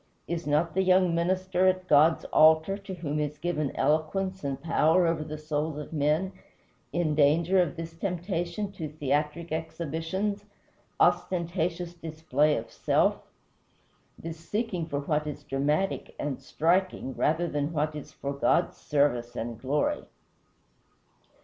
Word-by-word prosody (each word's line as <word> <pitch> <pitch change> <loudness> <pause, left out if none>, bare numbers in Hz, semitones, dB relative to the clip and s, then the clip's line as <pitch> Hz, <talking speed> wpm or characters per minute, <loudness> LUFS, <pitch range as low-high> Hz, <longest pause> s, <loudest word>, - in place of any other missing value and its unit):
Is 170 -2 -3
not 155 +3 +1
the 190 - +2
young 185 -2 +4
minister 185 +2 +1
at 185 0 +1
God's 155 +2 +5
altar, 160 +4 +5
to 200 -1 -8
whom 155 -3 -3
is 150 0 -2
given 155 -3 -1
eloquence 185 +5 0
and 140 -1 -2
power 165 +3 +3
over 165 -2 0
the 155 0 -6
souls 155 0 -2
of 150 +2 -7
men, 155 +5 +1 0.6
in 170 -3 0
danger 160 +5 +4
of 175 -2 -1
this 165 0 -7
temptation 175 +2 -3
to 165 -6 -6
theatric 150 +3 -2
exhibitions 165 +6 -3 0.5
ostentatious 175 -1 +1
display 155 -3 0
of 115 0 -6
self - - +2 1.0
this 165 0 -7
seeking 185 -1 -2
for 145 -3 -2
what 150 +1 -1
is 150 - -6
dramatic 150 +8 -1
and 140 -2 -3
striking, 170 0 0
rather 160 +6 +1
than 145 -1 -2
what 155 -1 -1
is 150 - -8
for 140 0 -5
God's 140 - +1
service 125 -5 0
and 115 0 -5
glory? 140 +3 0
160 Hz, 135 wpm, -28 LUFS, 150-175 Hz, 1.0 s, God's